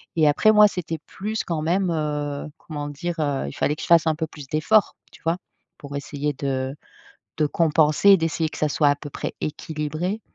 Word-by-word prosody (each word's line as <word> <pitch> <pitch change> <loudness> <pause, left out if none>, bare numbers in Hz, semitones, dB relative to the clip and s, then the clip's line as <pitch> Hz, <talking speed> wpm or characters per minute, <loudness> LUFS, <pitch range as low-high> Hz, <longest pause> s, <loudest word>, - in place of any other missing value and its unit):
et 155 -2 +4
après 180 +9 +5
moi, 210 -1 +7
c'était 170 -4 -4
plus 215 +3 -3
quand 165 -3 -2
même, 180 +4 +1
heu, 150 -2 -2
comment 145 -2 -6
dire, 165 +4 -4
heu, 145 - -1
il 70 - -6
fallait 150 - 0
que - - -9
je - - -5
fasse 165 -1 +5
un 155 - +2
peu 160 - -2
plus 145 -3 -11
d'efforts, 175 +9 +2 0.2
tu - - -17
vois? 165 +2 +1 0.4
Pour 140 0 -8
essayer 145 +1 -3
de 135 -1 -2 0.6
de 155 - +2
compenser 155 +3 +3
et 195 - +9
d'essayer 165 -1 -1
que - - -10
ça 155 - +1
soit 145 0 +3
à - - +3
peu 145 0 -9
près - - -5
équilibré. 155 +6 -3
155 Hz, 210 wpm, -23 LUFS, 145-170 Hz, 0.6 s, et